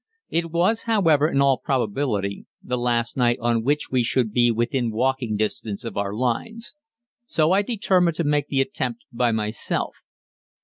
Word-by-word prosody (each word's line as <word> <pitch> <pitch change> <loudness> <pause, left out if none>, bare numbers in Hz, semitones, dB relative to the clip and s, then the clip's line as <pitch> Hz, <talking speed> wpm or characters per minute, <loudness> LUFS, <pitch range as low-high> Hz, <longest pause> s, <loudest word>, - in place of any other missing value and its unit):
It 170 0 0
was, 180 +7 +1
however, 165 -9 +4
in 140 -3 +2
all 135 -2 +3
probability 110 -6 -1 0.2
the 125 - -2
last 120 -1 0
night 120 -2 +3
on 115 -1 +1
which 145 +4 0
we 130 -1 +3
should 120 -1 +1
be 120 0 +4
within 120 +1 0
walking 120 -1 0
distance 105 -1 -2
of 115 -4 -6
our 100 -1 -1
lines, 175 - -2 0.5
so 155 -5 +2
I 195 +2 +4
determined 190 -6 +1
to 170 - -1
make 145 -1 +1
the 135 -2 +1
attempt 230 - -3
by 120 -1 +2
myself. 110 -1 -2
130 Hz, 165 wpm, -23 LUFS, 115-165 Hz, 0.5 s, however